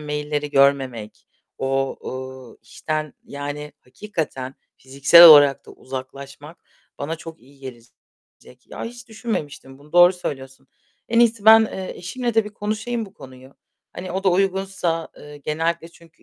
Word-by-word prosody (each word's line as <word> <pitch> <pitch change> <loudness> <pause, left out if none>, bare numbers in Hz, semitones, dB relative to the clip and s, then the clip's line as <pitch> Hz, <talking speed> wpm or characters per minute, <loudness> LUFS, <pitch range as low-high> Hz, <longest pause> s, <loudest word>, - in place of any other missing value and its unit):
mail'leri 150 0 -4
görmemek, 135 -6 0 0.3
o, 135 0 -1
ııı, 130 -1 -8
işten, 155 +5 -5
yani, 145 +1 -7
hakikaten 135 -5 -6 0.2
fiziksel 140 +6 +6
olarak 145 -4 +8
da - - -13
uzaklaşmak 135 +4 -10 0.4
bana 155 +4 -4
çok 165 0 -11
iyi 140 +2 -21
gelecek. 125 0 -16
Ya, - - -8
hiç 240 +1 -10
düşünmemiştim 175 - -6
bunu, 150 +1 -20
doğru 175 +1 +7
söylüyorsun. 135 -6 -8 0.4
En 230 0 +1
iyisi 230 -3 +2
ben, 220 0 +8
eee, 190 -3 -7
eşimle 235 +6 -4
de 225 - +3
bir 210 0 -10
konuşayım 220 +2 -3
bu 195 - -18
konuyu. 130 -1 -15 0.4
Hani, 180 0 -7
o 190 +1 -4
da 190 - +4
uygunsa, 190 -3 -1
ııı, 150 0 -12
genellikle 165 +3 -3
çünkü 170 0 -22
150 Hz, 140 wpm, -21 LUFS, 135-190 Hz, 0.4 s, olarak